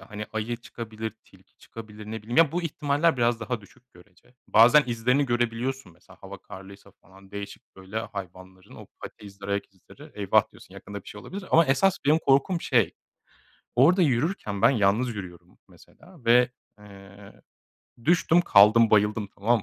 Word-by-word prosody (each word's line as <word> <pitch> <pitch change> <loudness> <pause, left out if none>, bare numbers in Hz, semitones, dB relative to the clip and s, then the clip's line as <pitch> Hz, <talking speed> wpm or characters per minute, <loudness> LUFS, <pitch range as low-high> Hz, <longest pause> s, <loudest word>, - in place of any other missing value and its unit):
Hani 105 +2 -8
ayı 110 +2 -3
çıkabilir, 110 -2 -7
tilki - - -24
çıkabilir, 110 -2 -12
ne 110 0 -7
bileyim. 120 +3 -6
Ya, 160 -3 +5
bu 175 +1 -2
ihtimaller 150 0 0
biraz 120 -1 +1
daha 115 +1 -4
düşük 120 +5 -22
görece. 90 +6 -22
Bazen 125 +7 +6
izlerini 125 +4 0
görebiliyorsun 120 -2 -2
mesela 90 +2 -20
hava 95 0 -10
karlıysa 100 +1 -13
falan. 95 +1 -19
Değişik 100 -1 -10
böyle 95 +3 -6
hayvanların 95 -3 -10
o - - -12 0.2
pati 105 - -10
izleri, 100 0 -10
ayak 100 0 -3
izleri. 145 - -16
"Eyvah." 100 -2 +1
diyorsun, - - -17
yakında 100 -1 -9
bir - - -14
şey 105 - -10
olabilir. 195 - -8
Ama 165 0 +5
esas 180 +9 +2
benim 150 +3 +4
korkum, 160 +4 +1
şey, 115 -10 +1 0.8
orada 165 +10 +4
yürürken 130 - -1
ben - - +6
yalnız 110 0 +1
yürüyorum 90 -4 -10
mesela 170 -6 -20
ve, 125 +1 +4 0.3
eee, 100 0 -15 0.6
düştüm, 170 0 +3
kaldım, 110 -6 +5
bayıldım 105 0 +2
tamam 115 +2 +1
110 Hz, 160 wpm, -25 LUFS, 100-135 Hz, 0.8 s, Bazen